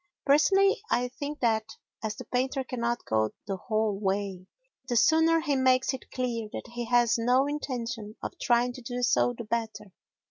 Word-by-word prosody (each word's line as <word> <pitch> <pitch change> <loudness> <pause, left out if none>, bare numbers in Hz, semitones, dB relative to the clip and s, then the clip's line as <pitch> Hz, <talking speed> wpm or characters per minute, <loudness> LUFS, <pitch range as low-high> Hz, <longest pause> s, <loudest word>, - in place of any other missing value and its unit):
Personally, 390 +8 +4
I 245 +1 +1
think 285 +3 -6
that, 220 -3 0 0.3
as 215 0 -2
the - - -9
painter 260 +2 -1
cannot 240 -2 -2
go 110 -1 0
the 195 -2 -3
whole 215 -1 -1
way, 195 -2 -2 0.4
the 240 - 0
sooner 320 +6 +4
he 295 -3 0
makes 260 0 +3
it 265 - -8
clear 235 -4 -3
that - - -7
he 240 0 -3
has 240 0 +3
no 250 +4 +3
intention 245 -7 -4
of - - -3
trying 245 0 +2
to 255 - -10
do 245 +1 -4
so 245 0 +2
the 235 - -5
better. 220 -3 -4
240 Hz, 175 wpm, -28 LUFS, 220-260 Hz, 0.4 s, Personally